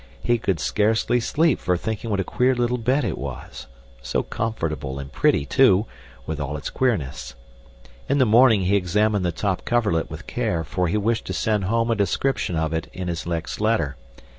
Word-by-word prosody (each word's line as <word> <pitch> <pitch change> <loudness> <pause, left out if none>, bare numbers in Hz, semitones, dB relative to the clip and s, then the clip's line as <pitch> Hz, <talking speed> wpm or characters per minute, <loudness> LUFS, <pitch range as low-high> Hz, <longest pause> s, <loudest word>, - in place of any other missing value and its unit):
He 120 -1 +2
could 95 -6 -1
scarcely 110 +8 +1
sleep 155 +4 +2
for 90 -2 0
thinking 110 +4 -4
what 100 -2 0
a - - +1
queer 125 +7 +1
little 120 0 0
bed 130 +5 +1
it - - -2
was, 70 -3 -7 0.3
so - - -1
comfortable 80 -11 -3
and 70 0 -7
pretty, 70 - +2
too, 110 - +4 0.4
with 80 +1 -4
all 75 +1 -3
its 70 - -6
queerness. 105 - -1 0.7
In 140 - +2
the 130 - +4
morning 115 -1 +5
he 95 +2 +2
examined 105 +2 +1
the 90 - +1
top 95 +3 -2
coverlet 105 -9 +1
with - - -8
care, 80 -1 -1
for 90 +2 -1
he 85 - 0
wished 110 +2 0
to - - -4
send 105 -4 0
home 115 +3 +1
a - - +2
description 105 -1 0
of 80 0 -1
it 80 - -2
in 90 -1 -4
his 85 0 -4
next 85 +3 -3
letter. 105 -11 +1
105 Hz, 190 wpm, -23 LUFS, 80-115 Hz, 0.7 s, morning